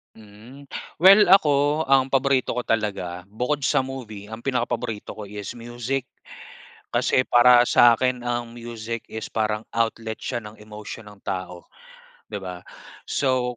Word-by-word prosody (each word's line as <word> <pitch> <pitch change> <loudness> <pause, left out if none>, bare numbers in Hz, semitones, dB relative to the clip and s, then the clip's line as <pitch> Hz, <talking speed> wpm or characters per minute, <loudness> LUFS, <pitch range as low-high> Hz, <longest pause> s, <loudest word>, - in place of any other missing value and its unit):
Mm. 110 +6 -14 0.3
Well 195 +4 +7
ako, 150 -4 +4
ang 135 -1 +5
paborito 135 -2 +1
ko 125 - -2
talaga 95 -6 -2
bukod 125 +8 -2
sa 135 - +2
movie, 110 -6 -8
ang 110 - -6
pinakapaborito 120 -4 -3
ko 105 -2 -8
is 105 -1 -7
music. 120 +3 -4 0.9
Kasi 130 - +2
para 120 0 +6
sa 120 -1 +6
'kin 125 0 0
ang 120 -1 -3
music 115 -1 -6
is 110 0 -7
parang 110 0 -1
outlet 115 -1 -2
siya 120 -3 -4
ng 105 +1 -12
emosyon 105 0 -9
ng 105 -1 -15
tao, 90 -2 -5 0.6
'di 105 - -5
ba? 90 -1 -7 0.5
So 125 -3 0
115 Hz, 140 wpm, -23 LUFS, 105-130 Hz, 0.9 s, Well